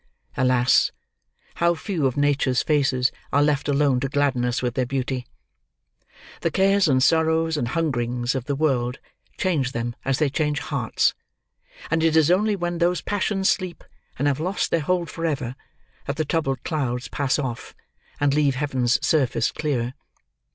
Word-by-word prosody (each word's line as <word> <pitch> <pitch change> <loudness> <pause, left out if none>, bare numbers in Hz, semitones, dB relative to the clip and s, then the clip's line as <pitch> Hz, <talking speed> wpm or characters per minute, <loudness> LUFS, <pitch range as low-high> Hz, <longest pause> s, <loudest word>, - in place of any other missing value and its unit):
Alas! 125 -1 +3 0.7
How 170 0 +3
few 160 -4 -1
of 130 - -3
Nature's 140 -3 +2
faces 135 -4 +2 0.2
are 145 - +4
left 145 -1 +1
alone 140 -2 +2
to 135 +1 -2
gladden 140 -3 +1
us 125 +1 -1
with 120 -1 -1
their 130 -1 -1
beauty! 130 -1 -3 1.1
The - - 0
cares, 195 0 +3
and 130 -3 +3
sorrows, 160 +1 +2
and 120 -6 -1
hungerings, 125 -5 -1
of 130 -3 -3
the 140 - -1
world, 130 -4 0 0.4
change 150 -9 0
them 120 0 -3
as 135 -1 0
they 155 - +2
change 150 +1 -1
hearts; - - 0 0.8
and 160 - +2
it 165 -1 +3
is 160 +1 +5
only 205 +3 +2
when 175 -2 -3
those 175 +1 +1
passions 200 -1 -1
sleep, 185 -2 -1 0.3
and 145 - +1
have 140 0 +1
lost 185 +5 -1
their 170 - +3
hold 175 +3 0
for 165 - -6
ever, 135 -6 -2 0.5
that 140 - -2
the 155 +1 -1
troubled 140 -3 -1
clouds 130 -6 -2
pass 140 -2 0
off, 130 -5 -5 0.4
and 145 -1 +2
leave 145 -2 +2
Heaven's 130 -4 +1
surface 140 -6 +1
clear. 130 -5 -2
145 Hz, 165 wpm, -23 LUFS, 130-160 Hz, 1.1 s, is